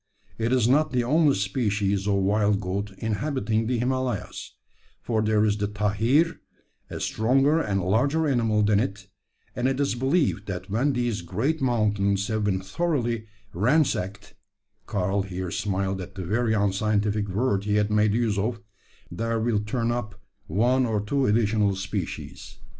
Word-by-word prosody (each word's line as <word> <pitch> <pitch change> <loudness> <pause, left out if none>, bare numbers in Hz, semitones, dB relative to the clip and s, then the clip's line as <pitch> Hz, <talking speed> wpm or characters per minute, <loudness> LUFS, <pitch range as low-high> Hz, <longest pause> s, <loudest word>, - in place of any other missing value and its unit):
It 115 +1 0
is 125 -3 +3
not 150 +5 +3
the 125 -2 +1
only 150 +3 +3
species 100 -1 0
of 100 - +2
wild 100 +1 +2
goat 100 +1 -3
inhabiting 110 -1 -1
the 125 0 0
Himalayas; 125 -2 -3 0.4
for 110 -2 -1
there 110 0 +2
is 105 -1 +1
the 105 0 -1
`tahir,' 105 +10 +1 0.5
a - - -6
stronger 135 +8 +2
and 100 - -1
larger 140 - +2
animal 115 -6 +2
than 105 -1 +3
it; 100 -1 -3 0.5
and 125 +1 0
it 135 0 -1
is 140 - +1
believed 130 - 0
that 95 0 -5
when 130 +7 +1
these 120 -5 -1
great 115 - -1
mountains 105 -5 +1
have 110 -1 -1
been 95 -2 0
thoroughly 120 - -1 0.3
ransacked 100 - 0 0.5
[Karl 100 +1 0
here 95 -2 -5
smiled 95 -1 -2
at 90 - -9
the 95 -2 -5
very 110 +4 +1
unscientific 105 +1 +1
word 100 0 0
he 105 0 +1
had 105 0 +1
made 105 0 +3
use 115 -4 +1
of], 115 +3 -1 0.5
there 115 +5 -1
will 110 -1 +1
turn 115 +3 -1
up 110 -4 -4 0.3
one 125 +8 +2
or 110 -2 0
two 130 +6 0
additional 105 -2 +2
species. 95 -2 -6
105 Hz, 155 wpm, -25 LUFS, 100-120 Hz, 0.5 s, is